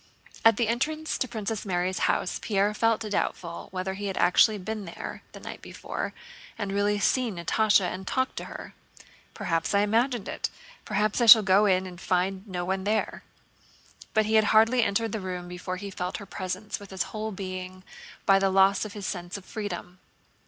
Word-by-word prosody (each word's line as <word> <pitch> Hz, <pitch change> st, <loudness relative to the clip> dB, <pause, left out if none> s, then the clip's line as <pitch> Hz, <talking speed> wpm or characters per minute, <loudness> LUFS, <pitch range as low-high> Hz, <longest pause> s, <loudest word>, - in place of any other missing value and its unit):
At 225 Hz, -2 st, +6 dB
the 235 Hz, -, +1 dB
entrance 310 Hz, +7 st, -1 dB
to 260 Hz, -, 0 dB
Princess 220 Hz, -2 st, -4 dB
Mary's 185 Hz, -1 st, -1 dB
house 180 Hz, -, 0 dB
Pierre 205 Hz, 0 st, +1 dB
felt 225 Hz, +1 st, +2 dB
doubtful 185 Hz, -5 st, -3 dB
whether 185 Hz, +1 st, -3 dB
he 200 Hz, +1 st, -4 dB
had 190 Hz, -, -3 dB
really 210 Hz, +4 st, +5 dB
been 210 Hz, +2 st, -5 dB
there 170 Hz, -, -7 dB
the -, -, -9 dB
night -, -, -8 dB
before -, -, -5 dB, 0.5 s
and 205 Hz, -3 st, -3 dB
really 205 Hz, +1 st, +1 dB
seen 230 Hz, +1 st, +1 dB
Natásha 205 Hz, +5 st, +3 dB
and 185 Hz, +1 st, -4 dB
talked 260 Hz, 0 st, 0 dB
to -, -, -4 dB
her. -, -, -9 dB, 0.6 s
"Perhaps 165 Hz, +3 st, -1 dB
I 200 Hz, -, +5 dB
imagined 230 Hz, +2 st, +1 dB
it; -, -, -3 dB, 0.4 s
perhaps 210 Hz, +3 st, 0 dB
I 235 Hz, -, +3 dB
shall 220 Hz, 0 st, +11 dB
go 200 Hz, +2 st, +4 dB
in 185 Hz, -1 st, +2 dB
and 180 Hz, -1 st, -9 dB
find 190 Hz, +2 st, 0 dB
no 180 Hz, -2 st, -3 dB
one 190 Hz, +1 st, -1 dB
there." 215 Hz, +2 st, -1 dB, 0.9 s
But 220 Hz, 0 st, +4 dB
he 215 Hz, -, -1 dB
had 220 Hz, -1 st, +5 dB
hardly 225 Hz, +4 st, +5 dB
entered 225 Hz, +1 st, 0 dB
the 220 Hz, -, -2 dB
room 180 Hz, -2 st, -5 dB
before 180 Hz, +1 st, -5 dB
he 200 Hz, +1 st, -7 dB
felt 180 Hz, -1 st, -3 dB
her 200 Hz, -, -9 dB
presence 190 Hz, +2 st, -5 dB
with 200 Hz, -1 st, -12 dB
his 190 Hz, -1 st, -2 dB
whole 220 Hz, 0 st, -3 dB
being 185 Hz, -1 st, -6 dB, 0.4 s
by 195 Hz, -1 st, +6 dB
the 195 Hz, 0 st, +2 dB
loss 195 Hz, 0 st, +4 dB
of 210 Hz, -, -7 dB
his 205 Hz, -2 st, -6 dB
sense 175 Hz, +1 st, -4 dB
of 190 Hz, -, -12 dB
freedom. 185 Hz, -4 st, -6 dB
200 Hz, 190 wpm, -27 LUFS, 185-220 Hz, 0.9 s, shall